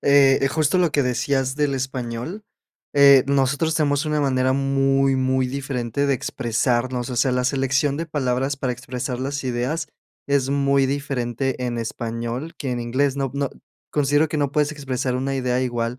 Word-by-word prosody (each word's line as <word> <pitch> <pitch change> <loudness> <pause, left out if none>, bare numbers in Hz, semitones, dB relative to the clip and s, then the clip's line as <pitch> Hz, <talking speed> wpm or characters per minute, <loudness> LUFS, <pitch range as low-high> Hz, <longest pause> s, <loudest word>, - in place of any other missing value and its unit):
eh, 135 -1 +5
justo 155 +4 +1
lo 175 -3 +3
que 145 - +2
decías 130 +1 0
del 145 -2 0
español, 130 - -4 0.5
eh, 140 -2 +7
nosotros 140 +3 +1
tenemos 145 -1 +1
una 150 -1 0
manera 130 -1 +2
muy, 135 0 +2
muy 130 0 +1
diferente 135 -1 -2
de 140 - +2
expresarnos. 120 +1 -1
O 125 - -4
sea, 130 +2 +3
la 125 0 0
selección 135 +2 +1
de 165 - -3
palabras 135 -2 -1
para 130 -2 -2
expresar 125 0 -5
las 140 +1 -3
ideas 130 +6 -2 0.4
es 140 -2 +1
muy 140 -1 +2
diferente 135 -2 -2
en 120 -1 -2
español 115 +5 -4
que 135 -4 -4
en 120 - -2
inglés. 130 +4 0
No 135 -2 -1
no 140 -1 -1 0.4
considero 145 +1 +2
que 150 - -2
no 145 -2 0
puedes 150 +1 +1
expresar 130 -3 -3
una 135 +2 -1
idea 125 -1 0
igual. 120 -1 -2
135 Hz, 170 wpm, -22 LUFS, 125-140 Hz, 0.5 s, eh